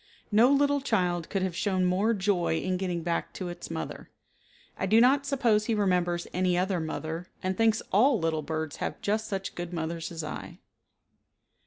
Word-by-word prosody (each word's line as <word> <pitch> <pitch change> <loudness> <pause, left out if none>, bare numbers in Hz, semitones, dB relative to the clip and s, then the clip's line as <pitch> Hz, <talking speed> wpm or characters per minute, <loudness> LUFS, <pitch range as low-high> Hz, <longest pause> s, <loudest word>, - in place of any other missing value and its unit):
No 225 +4 +6
little 285 0 +3
child 180 - 0
could 195 -2 -1
have 185 -3 -2
shown 185 -1 +1
more 200 +6 +2
joy 190 -5 +1
in 185 +1 -1
getting 180 -3 -2
back 170 0 -2
to 185 -2 -5
its 175 - -8
mother. - - -6 0.7
I 190 - -2
do 220 +4 +5
not 275 +4 +4
suppose 235 -7 +2
he 225 - +1
remembers 180 -4 +1
any 180 0 +1
other 185 0 +1
mother, 160 +2 -4 0.2
and 185 0 0
thinks 225 0 +2
all 240 +6 +5
little 160 -2 0
birds 155 0 -4
have - - -4
just 215 +1 0
such 195 -1 -4
good 175 0 -5
mothers 165 0 -3
as 165 -1 -5
I. 155 - -7
185 Hz, 180 wpm, -28 LUFS, 170-215 Hz, 0.7 s, No